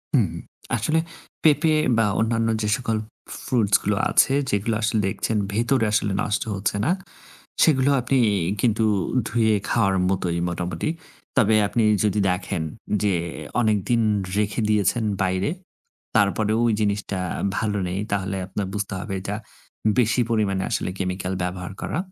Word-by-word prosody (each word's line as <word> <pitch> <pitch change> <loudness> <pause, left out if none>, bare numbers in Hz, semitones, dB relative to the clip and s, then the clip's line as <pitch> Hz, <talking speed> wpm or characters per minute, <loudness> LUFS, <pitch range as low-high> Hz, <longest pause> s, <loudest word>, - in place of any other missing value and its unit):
হুম, 110 -9 +3 0.5
আসলে 155 +9 +1 0.4
পেঁপে 155 +1 +4 0.2
বা 115 - +4
অন্যান্য 115 0 +1
যে 105 - 0
সকল 115 -3 -1 0.5
fruits 110 -6 +2
গুলো 105 0 +1
আছে, 135 - +4 0.2
যেগুলো 105 +3 0
আসলে 110 0 +1
দেখছেন 105 +3 -1 0.2
ভেতরে 120 +2 +2
আসলে 105 -1 +1
নষ্ট 105 - 0
হচ্ছে 100 +1 -1
না, 160 - +3 0.7
সেগুলো 140 -3 +4
আপনি 130 +2 +1 0.4
কিন্তু 110 -1 +2 0.4
ধুয়ে 110 -2 +2
খাওয়ার 100 -5 +2
মতোই 90 -3 0
মোটামুটি। 85 - -3 0.5
তবে 110 -4 +4
আপনি 115 +1 +1 0.2
যদি 105 0 +2
দেখেন, 90 -1 -2 0.4
যে 100 -2 +2 0.5
অনেকদিন 110 +1 +2 0.4
রেখে 105 +2 0
দিয়েছেন 105 +2 +2 0.2
বাইরে, 95 +1 0 0.7
তারপরেও 105 +1 +2
ঐ - - +4
জিনিসটা 100 -2 -1 0.4
ভালো 105 -2 -1
নেই, 90 +2 -3
তাহলে 95 0 -1
আপনার 100 +1 -3
বুঝতে 105 -1 -3
হবে, 100 0 -5
এটা 105 +2 -3 0.6
বেশি 120 +1 +3
পরিমাণে 100 -4 +1
আসলে - - -1
chemical 95 0 -2
ব্যবহার 90 +1 -4
করা। - - -2
105 Hz, 135 wpm, -23 LUFS, 95-115 Hz, 0.7 s, পেঁপে